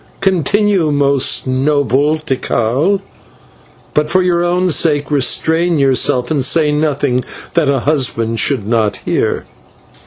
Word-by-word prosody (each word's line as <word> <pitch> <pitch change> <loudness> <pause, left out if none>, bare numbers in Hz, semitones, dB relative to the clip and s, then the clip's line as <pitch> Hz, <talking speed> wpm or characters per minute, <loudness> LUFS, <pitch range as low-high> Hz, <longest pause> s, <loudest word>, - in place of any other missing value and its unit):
Continue, 190 -1 +1
most 140 -2 +1
noble 140 +2 +1
Tikal; 140 - -1 0.9
but, 150 0 0
for 185 +2 +2
your 175 -1 +1
own 180 +1 0
sake, 145 -3 0
restrain 160 +4 +1
yourself, 130 -2 +1
and 145 -4 0
say 150 +2 +2
nothing 145 -4 0 0.3
that 165 -4 +1
a 135 -3 +1
husband 115 -6 -1
should 125 -3 +1
not 110 -2 0
hear." - - -1
145 Hz, 120 wpm, -14 LUFS, 130-165 Hz, 0.9 s, for